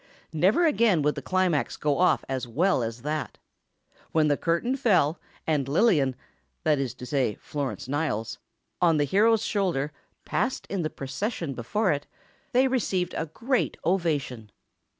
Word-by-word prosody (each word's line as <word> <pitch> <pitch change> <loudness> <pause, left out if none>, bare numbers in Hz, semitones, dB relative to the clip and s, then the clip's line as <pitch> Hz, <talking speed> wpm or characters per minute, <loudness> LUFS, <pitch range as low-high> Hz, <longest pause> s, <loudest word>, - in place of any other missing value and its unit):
Never 190 - +3
again 230 - +3
would 150 +1 +2
the - - -6
climax 185 -6 0
go 145 0 0
off 180 0 +3
as 130 -1 -3
well 160 +6 +2
as 115 +1 -4
that. 150 +1 -3 0.7
When 155 -2 +3
the 145 - +3
curtain 170 - 0
fell, 180 - +2 0.3
and 145 -4 0
Lillian—that 150 - 0
is 135 -3 -2
to 125 - -9
say, 130 -5 0
Florence 140 -4 -5
Niles—on 145 +4 -2
the 145 - +3
hero's 215 +9 +3
shoulder, 175 -9 0 0.3
passed 260 - -1
in 195 -2 -1
the 155 - -1
procession 155 - -4
before 180 - 0
it, 145 -1 -2 0.4
they 260 +1 +4
received 200 -8 0
a 160 - -2
great 245 - -1
ovation. 150 - -1
155 Hz, 145 wpm, -26 LUFS, 140-195 Hz, 0.7 s, they